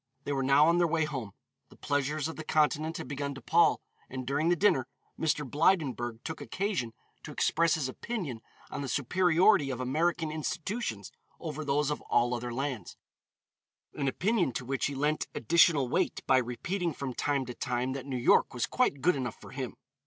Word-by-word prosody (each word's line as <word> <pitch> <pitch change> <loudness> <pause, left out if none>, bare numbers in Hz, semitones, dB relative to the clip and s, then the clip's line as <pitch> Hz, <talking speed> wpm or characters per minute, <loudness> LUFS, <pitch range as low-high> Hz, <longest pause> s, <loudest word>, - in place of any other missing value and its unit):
They 145 - -3
were 135 -1 0
now 140 +3 +5
on 170 +1 +4
their 175 - +4
way 160 -1 +1
home; 130 -10 -5 0.4
the - - -17
pleasures 145 +2 -1
of 160 - -6
the 160 - -6
Continent 155 +1 +1
had 160 - -6
begun 140 0 -4
to 135 - -9
pall, 170 +1 +3 0.3
and 130 0 -5
during 145 +5 +1
the 175 - +4
dinner, 165 -10 +3 0.3
Mr. 150 -2 0
Blydenburg 130 -7 +1
took 160 -1 -6
occasion 185 - -2 0.3
to - - -9
express 165 0 +2
his 150 -5 -1
opinion 145 - -5 0.3
on - - -4
the 140 - -3
superiority 175 - +3
of 130 -2 -3
American 160 +5 0
institutions 155 - -3 0.3
over 155 -2 -5
those 145 0 +1
of 150 - -3
all 120 +1 +3
other 120 0 -3
lands, 125 -6 -4 1.0
an 140 -2 -2
opinion 180 - +1
to 125 - -4
which 135 +2 -1
he 140 - -5
lent 150 +3 0
additional 150 +1 +4
weight 175 +8 -1
by 130 - +5
repeating 170 +9 -2
from 135 -2 -4
time 140 +1 0
to 125 - -6
time 125 0 -2
that 135 0 -6
New 130 -2 -2
York 125 - +3
was 120 - 0
quite 200 - 0
good 180 +4 +3
enough 125 -5 -4
for - - -12
him. 130 -3 -5
145 Hz, 190 wpm, -30 LUFS, 130-165 Hz, 1.0 s, now